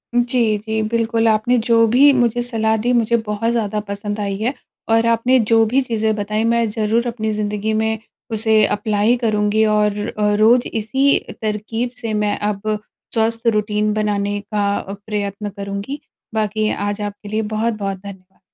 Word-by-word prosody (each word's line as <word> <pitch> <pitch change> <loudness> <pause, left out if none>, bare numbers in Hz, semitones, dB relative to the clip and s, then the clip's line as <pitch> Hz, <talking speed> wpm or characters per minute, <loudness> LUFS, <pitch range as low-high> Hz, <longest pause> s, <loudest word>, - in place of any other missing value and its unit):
उम, 240 - +4
जी, 230 -4 +2
जी। 220 +1 -2
बिल्कुल, 230 0 +1
आपने 230 +4 +2
जो 230 - +4 0.2
भी 280 +4 +7
मुझे 240 -2 +2
सलाह 220 -2 0
दी, 245 - +3
मुझे 235 +1 +1
बहुत 210 +2 0
ज़्यादा 215 -3 -1
पसंद 205 +1 -4
आई 200 -1 -2
है 245 +5 0 0.4
और 225 0 +3
आपने 240 +3 +3
जो 225 - +6
भी 270 - +4
चीज़ें 220 -3 0
बताईं, 210 +1 -1
मैं 230 -1 +1
ज़रूर 220 +2 0
अपनी 220 -2 -3
ज़िंदगी 210 +1 -1
में 220 0 0 0.4
उसे 220 0 +2 0.2
अप्लाय 210 +2 +2
करूँगी 210 -1 +2
और 210 -1 +1
अ, 210 -1 0
रोज़ 240 +3 +5
इसी 265 +6 +2 0.2
तरकीब 220 +3 -2
से 225 -1 -3
मैं 205 - 0
अब 210 +1 -2 0.4
स्वस्थ 230 +1 0
रूटीन 210 0 0
बनाने 205 -1 -1
का 205 -1 +1 0.4
प्रयत्न 205 -1 -3
करूँगी। 200 +8 -5 0.3
बाकी 215 0 0 0.2
आज 205 +1 -4
आपके 205 0 -12
लिए 215 +1 0
बहुत-बहुत 215 -3 -1
धन्यवाद। 190 -1 -13
215 Hz, 160 wpm, -19 LUFS, 210-230 Hz, 0.4 s, भी